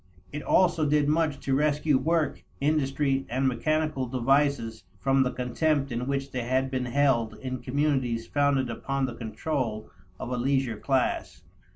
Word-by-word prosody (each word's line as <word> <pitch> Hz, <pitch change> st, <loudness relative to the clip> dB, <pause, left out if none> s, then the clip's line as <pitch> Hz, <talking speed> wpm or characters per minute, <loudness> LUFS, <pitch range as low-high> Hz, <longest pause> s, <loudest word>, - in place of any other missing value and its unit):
It 145 Hz, -, -4 dB
also 170 Hz, -4 st, +3 dB
did 150 Hz, -1 st, +3 dB
much 150 Hz, -2 st, +1 dB
to 135 Hz, -, -1 dB
rescue 150 Hz, +1 st, +2 dB
work, 160 Hz, +2 st, 0 dB, 0.2 s
industry, 140 Hz, -2 st, +1 dB
and 130 Hz, +3 st, +1 dB
mechanical 150 Hz, +1 st, 0 dB
devices 130 Hz, -2 st, +1 dB, 0.2 s
from 135 Hz, +3 st, +2 dB
the 130 Hz, -, +2 dB
contempt 135 Hz, +3 st, 0 dB
in 120 Hz, +2 st, -3 dB
which 140 Hz, 0 st, -2 dB
they 125 Hz, -, -2 dB
had 130 Hz, +2 st, 0 dB
been 130 Hz, -1 st, -1 dB
held 125 Hz, -4 st, +1 dB
in 130 Hz, -1 st, -5 dB
communities 130 Hz, -4 st, 0 dB
founded 140 Hz, -2 st, +1 dB
upon 135 Hz, +3 st, -2 dB
the 125 Hz, -, -4 dB
control 115 Hz, -1 st, -3 dB, 0.3 s
of 125 Hz, -, -5 dB
a 125 Hz, -, -1 dB
leisure 130 Hz, -2 st, 0 dB
class. 135 Hz, +2 st, -1 dB
135 Hz, 155 wpm, -27 LUFS, 125-145 Hz, 0.3 s, also